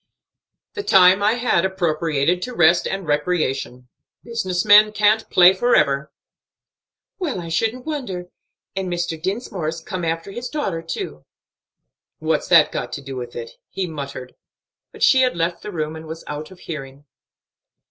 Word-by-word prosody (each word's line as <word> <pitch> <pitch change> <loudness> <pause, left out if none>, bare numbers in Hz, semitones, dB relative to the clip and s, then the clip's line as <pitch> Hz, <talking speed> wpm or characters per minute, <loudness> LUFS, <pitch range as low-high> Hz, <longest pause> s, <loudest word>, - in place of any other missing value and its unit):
"The 415 - -4
time 190 - +5
I 210 +2 +3
had 240 -8 +1
appropriated 170 -3 0
to 250 +3 -5
rest 170 -1 +4
and 195 -1 -4
recreation. 145 -5 -1 0.4
Business 190 -6 -2
men 210 +1 +7
can't 215 +1 +2
play 180 +1 +7
forever." 150 - +2 1.1
"Well, 310 - -2
I 170 -1 -7
shouldn't 225 +9 -1
wonder. 195 - -5 0.4
And 190 -2 -3
Mr. 175 -2 -3
Dinsmore's 180 -4 -3
come 180 +1 -6
after 165 +3 -2
his 240 +5 -6
daughter, 195 - -2
too." 75 - -6 0.9
"What's - - -1
that - - +6
got - - -4
to - - -5
do 135 -1 -7
with 120 -1 -7
it?" 115 -1 -6 0.2
he 190 - -3
muttered. 140 -5 -7 0.6
But - - -6
she 260 - +6
had 255 -8 +1
left 170 +1 -1
the 210 - -7
room 155 -3 -3
and 160 0 -9
was 160 +1 -8
out 150 +1 -6
of 185 -2 -15
hearing. 140 -3 -8
175 Hz, 155 wpm, -21 LUFS, 155-205 Hz, 1.1 s, men